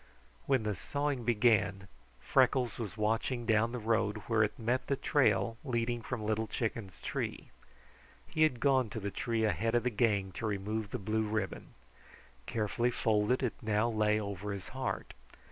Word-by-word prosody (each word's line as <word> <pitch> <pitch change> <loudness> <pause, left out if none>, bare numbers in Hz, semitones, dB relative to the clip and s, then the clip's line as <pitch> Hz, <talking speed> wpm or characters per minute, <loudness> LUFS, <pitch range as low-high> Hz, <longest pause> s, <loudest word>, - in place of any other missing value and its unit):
When 130 -4 +3
the 105 -1 0
sawing 140 +3 -2
began, 105 -4 +2 0.3
Freckles 125 -3 +2
was 110 -2 -5
watching 115 +3 0
down 110 +1 +3
the 125 - -3
road 110 -2 +1
where 115 0 +2
it 105 - -1
met 120 +3 -1
the 140 - +1
trail 130 -4 +2
leading 120 -3 -1
from 115 -2 -4
Little 110 +1 0
Chicken's 110 -5 -3
tree. - - -4 0.7
He 155 - -3
had 155 -6 +4
gone 130 -3 +3
to 110 - -5
the 100 -1 -3
tree 115 +1 -1
ahead 115 +2 +1
of 120 - +3
the 125 - +1
gang 105 -4 +1
to 110 - -4
remove 105 +1 -2
the - - -3
blue 110 +2 -1
ribbon. 110 +1 -3 0.7
Carefully 115 +2 0
folded, 115 +1 +1
it 125 - 0
now 110 +1 +1
lay 105 -1 +2
over 100 -1 -4
his 100 -1 -7
heart. 130 0 -4
110 Hz, 165 wpm, -32 LUFS, 105-120 Hz, 0.7 s, had